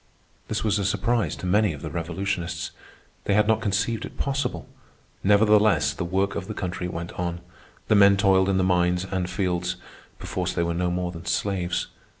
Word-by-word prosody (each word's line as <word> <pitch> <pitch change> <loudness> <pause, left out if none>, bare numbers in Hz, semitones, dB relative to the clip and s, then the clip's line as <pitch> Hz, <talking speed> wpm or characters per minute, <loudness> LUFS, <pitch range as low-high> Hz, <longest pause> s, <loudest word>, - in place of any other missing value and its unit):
This 110 - -2
was 105 -1 +1
a - - -1
surprise 115 +4 0
to - - -7
many 105 0 +3
of 75 - -10
the 80 - -5
revolutionists. 85 +1 -3 0.5
They 100 - +2
had 105 0 +4
not 110 0 +2
conceived 105 +2 0
it - - -9
possible. 135 - -2 0.6
Nevertheless 105 -7 +4
the 90 - -4
work 95 +3 0
of 95 -1 -4
the 110 - -5
country 90 -1 -3
went 85 -1 -5
on. 85 -1 -2 0.5
The - - +3
men 100 -1 +6
toiled 95 -1 +4
in 95 - +2
the 95 - +2
mines 90 0 +2
and 95 -2 -2
fields—perforce 90 -1 -4
they 85 - 0
were 85 0 -1
no 90 +1 0
more 90 0 -2
than 85 -1 -10
slaves. 95 -3 -1
95 Hz, 180 wpm, -25 LUFS, 90-105 Hz, 0.6 s, men